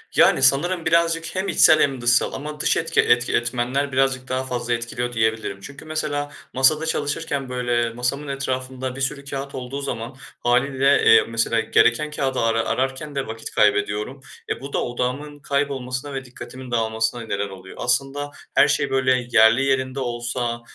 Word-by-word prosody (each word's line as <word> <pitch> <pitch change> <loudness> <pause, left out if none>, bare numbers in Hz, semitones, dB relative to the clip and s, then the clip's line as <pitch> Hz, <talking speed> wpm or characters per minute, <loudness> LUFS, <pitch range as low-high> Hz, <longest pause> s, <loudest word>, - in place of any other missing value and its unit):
Yani, 135 - +5
sanırım 165 +6 +3
birazcık, 165 +1 +1
hem 190 +1 -1
içsel 155 -3 +6
hem 135 -3 +1
dışsal 120 +1 +2
ama 150 +2 -6
dış - - +2
etki 165 0 +2
etki 120 +1 +2
etmenler 125 +4 0
birazcık 130 -1 +1
daha 130 0 -1
fazla 120 -1 -2
etkiliyor 120 +1 -3
diyebilirim. 110 -3 -1
Çünkü, 140 +7 -11
mesela, 145 -2 -3 0.2
masada 150 +5 +3
çalışırken, 145 -3 -2
böyle, 120 -2 0
masamın 125 +5 -3
etrafında 130 -1 -4
bir 135 - -7
sürü 140 +1 -2
kağıt 140 0 -6
olduğu 130 +2 -5
zaman, 120 -1 -5 0.2
hâliyle, 135 +3 +2
eee, 115 - +8
mesela, 115 0 0
gereken 120 +6 +2
kâğıdı 135 -3 -1
ara 115 0 +1
ararken 135 +3 -2
de 135 - -2
vakit 110 0 -7
kaybediyorum. 105 +5 +1 0.3
E, - - -3
bu 140 +1 -8
da - - 0
odağımın 130 +5 -3
kaybolmasına 140 -1 -2
ve 135 0 -5
dikkatimin 125 0 -10
dağılmasına 115 0 0
neden 100 -2 -3
oluyor. 95 -1 -11
Aslında 135 +4 -1 0.2
her - - +6
şey, 140 -1 +1
böyle, 130 -2 +1
yerli 115 +3 +5
yerinde 130 0 0
olsa, 120 -1 -3
130 Hz, 160 wpm, -22 LUFS, 120-140 Hz, 0.3 s, eee